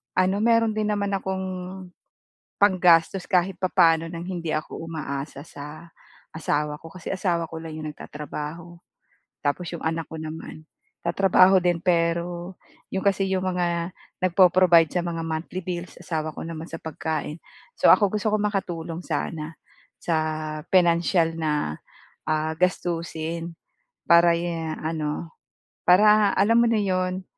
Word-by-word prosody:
ano, 185 +1 +3
meron 230 0 +3
din 215 -1 0
naman 205 -1 0
akong 190 -1 -2 1.2
panggastos 180 -2 +4
kahit 185 +1 +1
papaano 170 -3 +3
ng 170 0 -6
hindi 170 -4 -3
ako 155 - -3
umaasa 140 -4 -5
sa 150 +4 -10 0.5
asawa 150 -2 -1
ko. 165 - -10
Kasi 185 -1 -11
asawa 170 -3 0
ko 160 - -8
lang 160 -1 -7
yung 155 - -5
nagtatrabaho, 150 +3 -7 0.7
tapos 160 +4 -1
yung 170 - -6
anak 165 0 -2
ko 160 - -6
naman, 155 0 -8 0.4
tatrabaho 185 +1 +5
din 175 -1 +2
pero 170 +1 -1 0.3
yung 190 +1 -3
kasi 195 -1 +2
yung 190 0 0
mga 175 -1 -1 0.2
nagpo-provide 180 -2 +5
sa 175 -1 -1
mga 165 -1 -3
monthly 165 +3 -4
bills, 175 0 -5
asawa 155 -2 -3
ko - - -6
naman 165 -1 -6
sa 165 -1 -8
pagkain. 155 0 -4 0.4
So, - - +3
ako 205 0 +1
gusto 215 0 0
kong 210 0 +1
makatulong 175 -4 -4
sana 155 0 -3 0.5
sa 165 - +1 0.6
pinansiyal 170 -1 +3
na, 150 - -1 0.5
ah, 155 0 0
gastusin 165 -1 -2 0.5
para 170 0 +7
ye 170 0 -2 0.2
ano, 160 0 -3 0.6
para 210 +3 +6
alam 220 +4 +4
mo 235 - +4
na 225 -2 +2
'yon, 185 -1 -1
170 Hz, 135 wpm, -24 LUFS, 160-185 Hz, 1.2 s, para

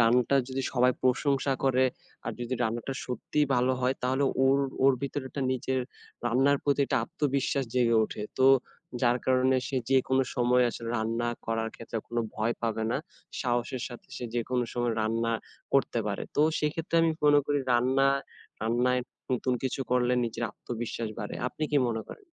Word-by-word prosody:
রান্নাটা 125 +3 +4
যদি 130 0 -2
সবাই 125 0 +4
প্রশংসা 135 +1 +2
করে 130 -1 +4 0.4
আর - - -1
যদি 120 +2 -2
রান্নাটা 120 +3 -2
সত্যিই 145 +4 -1
ভালো 125 +1 +3
হয়। 125 +1 +2
তাহলে 130 +2 +1 0.2
ওর, 135 +1 +4 0.3
ওর 135 - +7
ভিতর 140 +1 -2
একটা 140 - -5
নিজের 130 +1 -1 0.5
রান্নার 135 +4 +3
প্রতি 145 0 +2
একটা - - +1
আত্মবিশ্বাস 140 -1 0
জেগে 120 -2 +3
ওঠে। 105 - -6 0.2
তো, 130 - +5 0.6
যার 120 0 +4
কারণে 130 0 +3
সে 135 - -2
যেকোনো 130 0 +3
সময় 125 0 +3
আসলে 115 0 -6
রান্না 115 +2 -1 0.2
করার 115 0 -1
ক্ষেত্রে 115 0 -5
কোনো 120 0 -1
ভয় 110 +2 0
পাবে 115 -1 -1
না। - - +1 0.4
সাহসের 120 0 -1
সাথে 120 -2 -11
সে 125 - -5
যেকোনো 120 +1 0
সময় 120 -1 0
রান্না 115 +1 0 0.4
করতে 135 -3 +2
পারে। 100 -1 -2
তো, 150 - +5 0.2
সেক্ষেত্রে 160 +2 -1
আমি 165 - +3
মনে 145 0 +7
করি 145 0 +1
রান্না, 130 +3 +3 0.5
রান্নায় 125 +3 +2 0.3
নতুন 125 0 +1
কিছু 130 +1 -2
করলে 125 0 +3
নিজের 115 0 -3
আত্মবিশ্বাস 115 -1 -5
বাড়ে। 105 - -4
আপনি 155 +5 -4
কি 150 - +2
মনে 115 -1 -2
করেন? 410 - -11
125 Hz, 165 wpm, -28 LUFS, 120-135 Hz, 0.6 s, ওর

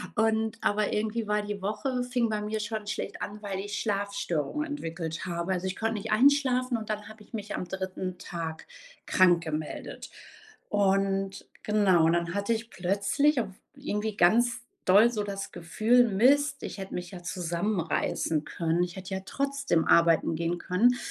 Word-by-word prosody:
Und 220 0 +1
aber 210 0 +1
irgendwie 220 +2 -1
war 210 0 +1
die 205 -1 -5
Woche 230 +6 -1
fing 245 -2 0
bei 215 -1 -1
mir 215 +1 -2
schon 215 0 -4
schlecht - - -4
an, 210 +1 -5
weil 195 -2 -4
ich 205 +1 -4
Schlafstörungen 200 - -1
entwickelt 165 - -4
habe. 170 +1 -2
Also, 180 0 -3
ich 190 - -3
konnte 225 0 0
nicht 215 +1 -4
einschlafen 255 +1 +4
und 220 -1 -7
dann 210 -1 -3
habe 215 -1 -12
ich - - -25
mich 210 -2 -4
am - - -3
3. 185 -1 -4
Tag 165 -2 -6 0.4
krankgemeldet. 165 -4 +1 0.6
Und 195 -1 +1 0.2
genau, 190 -6 +4
dann 170 +1 0
hatte 200 +3 -1
ich 225 0 -4
plötzlich 200 +11 +1
auch 215 - -4 0.3
irgendwie 210 0 -3
ganz 235 +7 +4 0.3
doll 205 +5 +7
so 215 -3 -2
das 195 -1 -5
Gefühl: 220 +8 +3
„Mist, 275 +7 +3
ich - - -5
hätte 195 -1 -7
mich 180 -1 -5
ja 180 -2 -9
zusammenreißen 170 -3 -1
können. 165 +2 0
Ich 175 -1 -4
hätte 190 +1 -6
ja 190 - -3
trotzdem 275 -9 0
arbeiten 165 -1 +4
gehen 170 +2 -1
können.“ 215 +8 +3
205 Hz, 165 wpm, -28 LUFS, 180-220 Hz, 0.6 s, doll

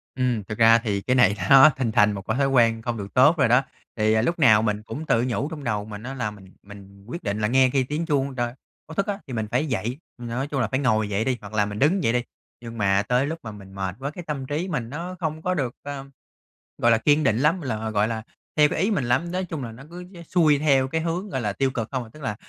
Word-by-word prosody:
Ừm, 125 -5 0
thực 105 +3 -7
ra 115 0 +7
thì 105 -4 -2
cái 125 +5 0
này 105 -5 +5 0.2
nó 135 +3 +9
hình 115 -4 -1
thành 105 0 +4
một 100 -1 -5
cái 110 - -1
thói 140 - +3
quen 115 -3 +3
không 120 -1 -3
được 100 -1 -7
tốt 145 +7 +6
rồi 135 - +4
đó. 125 +3 +5 0.3
Thì, 110 0 +2
à, 110 - +2
lúc 170 +7 -1
nào 110 -7 +6
mình 105 -1 -1
cũng 155 +8 -7
tự 115 +1 +2
nhủ 130 +5 -1
trong 150 -3 -7
đầu 105 -4 -1
mình 105 0 -9
á 130 +2 -6
là 125 -5 -2
"Mình 95 -2 -15
mình 100 -1 -14
quyết 170 +8 -7
định 105 0 -2
là 105 - +1
nghe 130 +1 +4
khi 135 -1 +1
tiếng 150 +5 -3
chuông 140 -3 0
đ 120 - -5 0.5
báo 160 - -8
thức 200 - +1
á, 205 -1 -2
thì 130 - -8
mình 110 -2 -2
phải 130 +6 0
dậy. 125 0 -3 0.2
Ừm, 120 -1 -7
nói 130 +4 -2
chung 140 -3 -3
là 110 - 0
phải 130 +4 -1
ngồi 110 -5 +1
dậy 105 +2 -1
đi, 125 -2 -1
hoặc 105 +1 -11
là 105 -1 +1
mình 105 0 -6
đứng 175 +7 +2
dậy 115 - +3
đi." 125 0 +1 0.4
Nhưng 115 -1 -9
mà 100 -1 +2
tới 125 +3 +2
lúc 165 +2 -4
mà 110 - -7
mình 95 -2 -12
mệt 95 -2 -3
quá, 140 +2 -4
cái 175 +2 -9
tâm 140 -4 -4
trí 155 +7 -3
mình 120 -8 -3
nó 175 +5 -6
không 155 -1 -3
có 185 +2 0
được, 130 -7 -2
ơ, 140 -1 -6 0.7
gọi 120 - +3
là, 115 - +5
kiên 145 +6 +3
định 110 -4 +2
lắm, 160 +6 +2
là, 110 -5 -3
gọi 105 0 +1
là, 110 -1 -4 0.3
theo 150 -1 +6
cái - - -3
ý 205 - +1
mình 185 -11 0
lắm. 130 +8 0
Nói 185 0 -2
chung 160 -6 -5
là 115 - -6
nó 125 +5 -12
cứ 175 +1 -9
dễ 170 -2 -11
xuôi 155 -4 +3
theo 135 -3 +3
cái 160 +3 -2
hướng, 175 +5 -3
gọi 130 - -3
là, 105 -3 -2
tiêu 135 +4 0
cực 115 -3 -4
không 130 -2 -2
à, 110 - -13
tức 155 - -13
là, 105 -5 -2
125 Hz, 295 wpm, -24 LUFS, 110-150 Hz, 0.7 s, nó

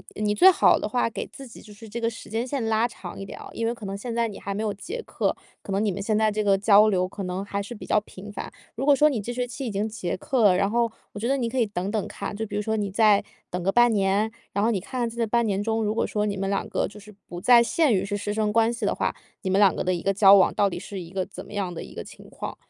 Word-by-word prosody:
你 - - -6
你 210 - +2
最 370 - +7
好 370 - +4
的 - - -2
话， 245 +1 0
给 - - -5
自 275 - -11
己 240 - -13
就 210 - -14
是 220 +2 -12
这 235 +3 -5
个 230 - 0
时 225 - -11
间 225 +4 -2
线 270 -2 -2
拉 225 +1 +2
长 180 -6 -9
一 195 - -6
点 - - -9
啊， - - -10
因 230 0 -2
为 235 - 0
可 230 -3 -10
能 195 0 -4
现 230 +3 -5
在 235 -1 +1
你 205 - -9
还 200 - -4
没 210 +2 -3
有 210 -2 -1
结 435 - -6
课， - - -1 0.3
可 195 - -5
能 200 - +1
你 210 - +1
们 195 +2 -5
现 210 +1 0
在 215 -1 +3
这 215 - -1
个 200 -2 +3
交 205 +1 +6
流 185 -3 +2
可 195 +2 -7
能 185 +2 -3
还 200 0 -3
是 205 +4 -7
比 - - -9
较 210 - +3
频 205 0 -11
繁。 - - -6 0.3
如 255 +4 -3
果 290 -1 +6
说 300 +3 +5
你 260 -6 -1
这 235 +4 -5
学 250 0 -1
期 245 +3 -6
已 - - -2
经 205 +1 -1
结 210 -5 -3
课 260 +5 -1
了， 185 -3 +6
然 195 +2 +1
后 235 0 +2 0.2
我 205 - -8
觉 230 - -2
得 270 - +2
你 240 -4 -1
可 260 - -2
以 235 - +4
等 195 -1 -4
等 215 -2 -1
看。 - - -6
就 220 +2 -4
比 - - -6
如 210 - 0
说 220 +1 -1
你 205 -2 -1
再 210 0 +4 0.3
等 180 0 -3
个 195 - +1
半 240 +2 +5
年， 200 +1 +2 0.2
然 200 - 0
后 230 - +3
你 205 - 0
看 240 +5 -3
在 235 - -12
这 230 - +1
半 235 +2 +2
年 200 -2 0
中， 225 +1 0
如 210 0 0
果 - - 0
说 210 0 -1
你 200 -2 -2
们 195 0 -2
2 200 - -1
个 - - 0
就 205 - -13
是 210 +1 -14 0.2
不 175 0 -7
再 240 +3 +7
限 290 0 +2
于 195 0 +1
是 205 - -3
师 205 0 -3
生 210 -1 0
关 230 +1 +3
系 235 -2 -3
的 - - +1
话， - - -1 0.3
你 190 - -3
们 190 - +3
2 200 -3 +5
个 - - -2
的 185 0 +1
一 175 - -3
个 195 - +2
交 195 0 +7
往 190 -2 +4
到 200 - +2
底 - - -5
是 195 -2 -7
一 170 - -9
个 190 -1 -2
怎 - - -10
么 - - -12
样 195 -4 -2
的 - - -6
一 - - -12
个 - - -5
情 - - -14
况， - - -6
210 Hz, 350 characters per minute, -25 LUFS, 195-230 Hz, 0.3 s, 最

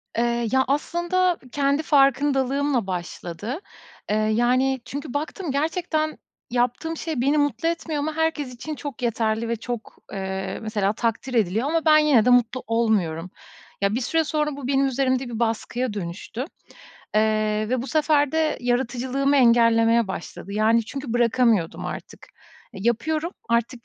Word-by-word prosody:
Iıı, 235 0 +1
ya, 265 0 +4
aslında 345 +5 +1
kendi 285 +1 +1
farkındalığımla 275 -3 +2
başladı. 180 - -5 0.5
Iıı, 215 0 +1
yani, 250 +3 +2
çünkü 285 -1 -6
baktım 310 +2 -3
gerçekten 310 +1 -1 0.3
yaptığım 250 +7 0
şey 315 -6 -3
beni 280 +4 +2
mutlu 290 +3 +1
etmiyor 330 -2 -3
ama 310 +2 -2
herkes 320 -5 -1
için 305 +6 -6
çok 285 -5 -7
yeterli 225 -1 0
ve 235 - +1
çok, 230 0 -6 0.2
ııı, 190 -1 -4
mesela 210 -2 0
takdir 230 +3 -2
ediliyor 225 +3 +1
ama 325 +1 0
ben 310 -1 +7
yine 295 -8 +4
de 250 - +4
mutlu 245 +1 +3
olmuyorum. 195 -8 0 0.5
Ya, 200 +2 +2
bir 255 - -1
süre 325 +6 +1
sonra, 300 -1 -1
bu 265 -3 -5
benim 275 0 +2
üzerimde 265 0 +1
bir 225 - -5
baskıya 235 +1 -1
dönüştü, 195 +3 -6 0.8
ııı, 215 0 +1
ve 250 0 0
bu - - -6
sefer 300 -2 +2
de 315 -1 +1
yaratıcılığımı 255 +3 0
engellemeye 230 -2 +4
başladı. 190 +1 -7
Yani, 220 +2 +3
çünkü 270 0 -6
bırakamıyordum 235 -6 +2
artık, - - -8 0.5
yapıyorum, 305 - -1 0.2
artık 235 0 0
250 Hz, 145 wpm, -24 LUFS, 225-290 Hz, 0.8 s, ben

